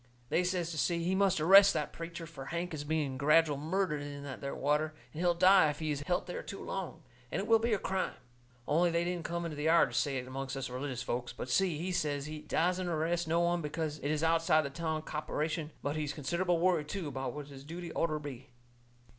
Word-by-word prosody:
They 180 - +2
says 180 -2 -1
to 155 - -3
Si 170 +5 +1
he 180 +2 +1
must 190 -2 +3
arrest 195 +5 +8
that - - -2
preacher, 170 0 -6
fur 150 -5 -9
Hank 170 +3 -3
is 150 -2 -4
being 145 -3 -1
gradual 150 +1 +4
murdered 160 0 -1
in 145 0 -7
that 135 -2 -7
there 140 -1 -4
water, 150 +2 0 0.2
and 155 - -5
he'll 175 -1 +3
die 185 -2 +6
if 145 - -3
he's 150 -2 -2
helt 180 - +1
there 180 - -5
too 195 - -7
long, 190 -4 -5 0.3
and - - -1
it 195 - -2
will 225 -1 +6
be 230 +1 0
a 215 - +3
crime. 190 -1 -2 0.5
Only 170 +4 +3
they 170 0 +1
didn't 175 -1 -3
come 170 0 -2
into 160 -2 -4
the 150 +1 -3
yard 165 -5 +5
to - - -6
say 135 +3 +1
it 125 - -4
amongst 135 +1 -4
us 130 -2 -4
religious 130 -1 -4
folks. 120 0 -3
But 120 - -6
Si, 185 -5 +2
he 180 +4 -3
says 145 -5 -1
he 155 0 -6
dassent 180 +4 0
arrest 170 +1 0
no 165 +2 +2
one 175 0 +1
because 155 0 -3
it 145 - -3
is 155 +1 0
outside 165 -1 +3
the 140 - -4
town 160 0 -2
copperation; 155 +1 -2
but 145 +1 -1
he's 150 -2 -2
considerable 170 +4 0
worried 170 -3 +2
too 180 0 -4
about 135 -2 -4
what 145 -1 -7
his 135 -1 -11
duty 170 +3 -7
orter 155 -2 0
be. 140 -3 -8
160 Hz, 235 wpm, -32 LUFS, 145-175 Hz, 0.5 s, arrest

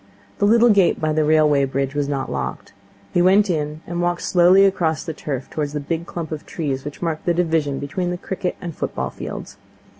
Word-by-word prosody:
The 205 - +3
little 235 +2 +5
gate 200 -4 +4
by 155 -1 0
the 155 0 +2
railway 150 -2 +4
bridge 135 0 -2
was 145 -1 -1
not 135 -2 -2
locked. - - -4 0.4
He 175 - +3
went 195 +2 +4
in, 150 -1 -3
and 175 0 -3
walked 175 0 -1
slowly 185 +2 +5
across 165 -5 +1
the 160 - -5
turf 140 -4 -5
towards 150 -2 -3
the 150 - -2
big 165 +3 -3
clump 165 -2 -5
of 155 -1 -5
trees 140 -5 -3
which 145 +4 -7
marked 160 -2 -2
the 175 - +3
division 160 -5 +1
between 175 +6 -3
the 175 - -2
cricket 180 0 -3
and 170 -3 -6
football - - -3
fields. - - -7
160 Hz, 210 wpm, -21 LUFS, 145-175 Hz, 0.4 s, little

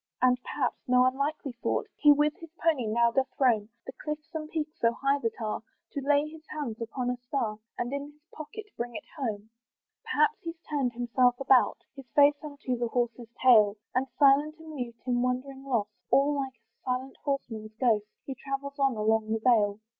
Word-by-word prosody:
Perhaps, 250 +1 +1
and 250 - 0
no 250 0 +6
unlikely 280 +2 -1
thought! - - 0
He 295 - +6
with 295 +1 +4
his 330 -2 -11
pony 310 -10 +1
now 235 +2 +3
doth 265 +2 +1
roam 225 -6 +3 0.2
The - - -6
cliffs 300 +1 -5
and 310 -1 -4
peaks 310 -1 -4
so 230 0 +3
high 275 +3 +1
that 230 -4 -3
are, 215 -2 -2 0.3
To 280 - -3
lay 290 +2 +3
his 315 0 -11
hands 255 -7 -5
upon 245 +2 -2
a 250 - -3
star, 245 -4 -3 0.2
And 240 +3 -2
in 280 0 -2
his 300 +1 -30
pocket 425 +8 -8
bring 240 0 -4
it - - -5
home. 220 -7 -4 0.5
Perhaps 450 - +2
he's 330 0 -6
turned 275 -5 0
himself 245 +1 +2
about, 265 -2 +4
His 270 -3 -11
face 290 0 +5
unto 285 -4 -3
his 240 - -8
horse's 240 -1 -2
tail, 215 -5 +6 0.2
And 255 +2 +1
still 275 +2 +5
and 305 +1 -8
mute, 290 -7 -6
in 245 -1 +1
wonder 255 +2 -1
lost, 250 -6 -2 0.2
All 280 +2 +4
like 270 -2 -3
a 225 0 -44
silent 255 +1 -3
horseman 230 -6 -3
ghost, 220 -5 +2 0.2
He 270 - -4
travels 275 +2 -5
on 270 -3 +3
along 220 0 +1
the 225 - +2
vale. 215 -3 +3
260 Hz, 190 wpm, -29 LUFS, 235-285 Hz, 0.5 s, no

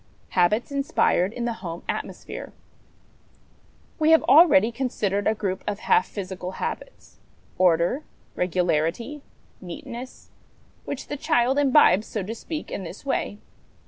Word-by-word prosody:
Habits 210 +8 +2
inspired 275 -9 +1
in 240 +1 -4
the 235 - -1
Home 170 -2 -6
Atmosphere. - - -5 1.5
We 310 0 +3
have 320 0 +6
already 290 -7 +6
considered 210 -6 -1
a 220 - +2
group 190 -3 -3
of 205 0 -3
half 180 - +3
physical 185 -2 -6
habits - - -6 0.4
order, 180 - +3 0.3
regularity, 180 - 0 0.4
neatness 235 +8 -9 0.5
which 280 - -5
the 290 - -5
child 255 +1 +2
imbibes, 260 -8 +5
so 210 - -3
to 210 +5 -5
speak, 310 +7 -6
in 195 - -4
this 180 +9 -9
way. 235 -6 -1
215 Hz, 125 wpm, -24 LUFS, 185-270 Hz, 1.5 s, have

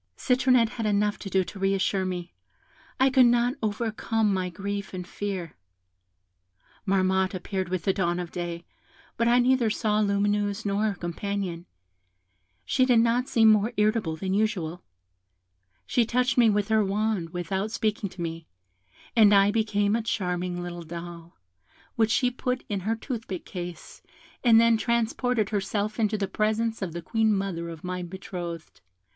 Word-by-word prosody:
Citronette 250 -2 +3
had 220 - 0
enough 210 0 +1
to 195 - -6
do 190 0 +2
to 195 - -10
re 195 0 +2
assure 190 0 0
me; 180 -1 -5 0.7
I 265 +1 +4
could 255 -1 +6
not 240 +1 +3
overcome 220 0 0
my 185 -1 -1
grief 200 +2 -5
and 180 -1 -5
fear. 190 -6 -5 1.3
Marmotte 190 0 +2
appeared 185 0 -3
with 185 -3 -2
the 195 - +2
dawn 175 -2 0
of 175 -2 -5
day, 170 -1 -5 0.5
but 230 - +1
I 240 +1 +5
neither 250 -2 +3
saw 215 0 0
Lumineuse 205 +1 0
nor 200 +1 +1
her 210 -2 0
companion; 180 0 -4 1.0
she 260 - +2
did 250 -3 +4
not 235 +2 +2
seem 225 -1 +5
more 215 +2 +3
irritable 210 -6 +1
than 190 +3 -3
usual; 180 -5 -1 1.0
she 240 - +2
touched 250 +3 +1
me 235 -3 +5
with 205 0 0
her 220 -1 +4
wand 200 -3 -1
without 190 +4 -3
speaking 215 -2 -1
to 175 -1 -7
me, 165 -1 -5 0.7
and 210 -3 +7
I 200 +1 +5
became 210 -1 +1
a 230 - 0
charming 180 -4 -2
little 175 -1 -6
doll, 170 0 -9 0.6
which 225 -1 +2
she 250 +2 +2
put 250 0 -2
in 205 -2 -2
her 215 +5 -1
toothpick 225 -6 -6
case, 175 -2 -8 0.4
and 230 -3 +7
then 230 0 +5
transported 235 -1 0
herself 205 +1 -2
into 215 -1 +1
the 200 -1 -1
presence 220 +2 -1
of 180 -4 -3
the 170 0 -6
Queen 220 +1 +1
mother 195 -4 -2
of 165 -2 -9
my 180 0 -3
betrothed. 175 -2 -7
205 Hz, 160 wpm, -26 LUFS, 180-225 Hz, 1.3 s, and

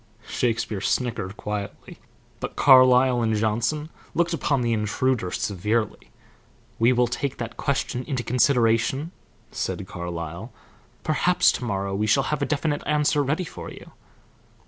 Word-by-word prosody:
Shakespeare 115 -4 -1
snickered 105 -4 -1
quietly, 105 -1 -6 0.4
but - - -5
Carlyle 130 -2 +6
and 110 -1 +1
Johnson 120 +8 0 0.3
looked 170 0 +1
upon 140 -5 0
the 120 -1 +1
intruder 110 0 0
severely. 105 +4 -2 0.7
"We 115 +2 +5
will 125 0 +3
take 125 +3 -3
that 115 -1 -5
question 135 -2 -2
into 130 -6 -2
consideration," 125 +4 +2 0.4
said 100 - -3
Carlyle. 85 +3 -6 0.5
"Perhaps 175 +3 +3
to 125 - -4
morrow 100 -3 -2
we 105 +2 0
shall 135 +6 +3
have 150 - -2
a 140 - 0
definite 145 0 -1
answer 150 0 +2
ready 150 +7 -1
for - - -8
you." - - -12
120 Hz, 135 wpm, -24 LUFS, 105-140 Hz, 0.7 s, Carlyle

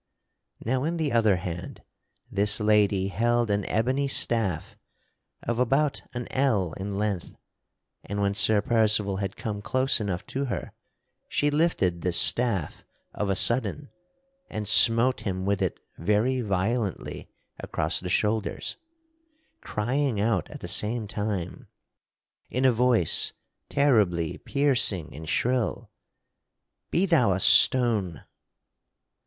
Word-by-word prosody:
Now 130 +3 0
in 165 +3 -2
the 155 -4 -1
other 110 -4 +3
hand 90 -1 -7 0.5
this 100 +2 +2
lady 105 -2 +2
held 120 +3 0
an 100 -1 -1
ebony 130 +6 0
staff 115 - -1 0.7
of 120 0 -2
about 135 +4 +1
an 120 -1 -5
ell 110 -11 0
in 100 +1 -5
length, 100 -4 -3 0.7
and 100 +1 -4
when 100 0 0
Sir 110 0 +3
Percival 105 -4 +2
had 100 0 -4
come 105 -2 -5
close 130 +2 +1
enough 95 -4 -4
to 140 +1 -3
her, 125 - -5 0.6
she 145 0 0
lifted 145 - 0
this 90 -1 +1
staff 110 -11 +2 0.3
of 105 - -3
a 95 - +1
sudden 130 +7 +2 0.6
and 105 -1 -5
smote 115 +5 +5
him 95 -2 -4
with 100 0 0
it 95 - -2 0.2
very 105 +8 +1
violently 100 0 -3 0.3
across - - -2
the 90 - -6
shoulders, 105 +3 -1 0.8
crying 125 +1 -2
out 105 -5 0
at - - -10
the - - -6
same 110 +1 -1
time, 100 -4 -4 0.8
in 130 +1 -1
a 130 - +6
voice 115 -7 +2 0.4
terribly 105 - +1
piercing 120 - +1
and 80 +1 -8
shrill: 120 +7 -1 1.0
"Be 180 - +1
thou 150 - +3
a 90 - -2
stone!" 105 - +4
110 Hz, 125 wpm, -26 LUFS, 95-125 Hz, 1.0 s, a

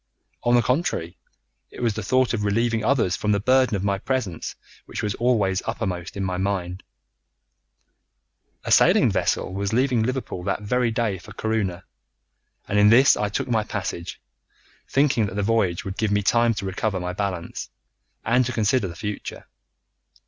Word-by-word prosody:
On 120 0 +3
the 120 - +4
contrary, 120 - -1 0.5
it - - -12
was 115 -3 +1
the 110 - -4
thought 130 +6 +2
of 105 -3 -1
relieving 115 +2 +1
others 115 -8 +2
from 105 0 0
the 100 - +1
burden 130 +1 +3
of 95 - -2
my 100 -1 0
presence 110 -9 -3 0.3
which - - -5
was 105 -1 0
always 105 -6 +1
uppermost 90 0 -3
in 100 - -2
my 90 -1 -2
mind. 95 -1 -2 1.8
A - - -4
sailing - - +5
vessel 95 - 0
was 100 +2 -2
leaving 125 -1 +2
Liverpool 120 -5 -3
that - - -2
very 125 +3 +1
day 110 -4 -1
for - - -12
Corunna, 100 -5 -2 0.8
and 105 - +1
in 105 0 +6
this 125 +5 +6
I 105 - -1
took 105 - -2
my 115 -3 +1
passage, 95 -5 -5 0.7
thinking 135 -6 +2
that 100 - -7
the 100 - 0
voyage 100 -5 +1
would 95 0 -5
give 110 -1 0
me 105 0 +1
time 115 +2 +3
to 100 - -4
recover 95 +1 -2
my 90 0 -4
balance, 95 -3 -4 0.6
and 125 +3 +3
to - - -2
consider 110 -1 +1
the 85 - -8
future. 105 +3 -6
105 Hz, 170 wpm, -24 LUFS, 95-120 Hz, 1.8 s, in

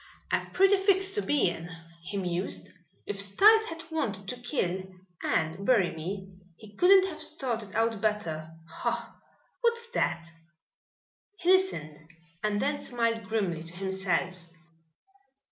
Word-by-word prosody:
"A - - 0
pretty 390 +1 +5
fix 385 0 +3
to 415 - +2
be 290 - +2
in," 175 0 -4 0.3
he 190 +4 -5
mused. 180 -1 -2 0.4
"If 200 -1 -1
Styles 425 - +6
had 330 -4 -5
wanted 200 -11 -2
to 250 - -4
kill 190 - -1 0.4
and 160 +4 0
bury 200 -7 +3
me 190 +4 -5 0.3
he 210 -2 -14
couldn't 375 - +6
have 385 - -6
started 230 -7 -3
out 225 -2 +1
better. 170 -8 -1 0.3
Ha! - - -2 0.5
What's 470 0 0
that?" 170 - 0 1.1
He 360 0 +2
listened 160 - +1 0.4
and 210 -1 0
then 285 +3 0
smiled 230 -3 -1
grimly 190 -6 -1
to 165 +2 -10
himself. 190 -1 -1
210 Hz, 130 wpm, -29 LUFS, -, 1.1 s, Styles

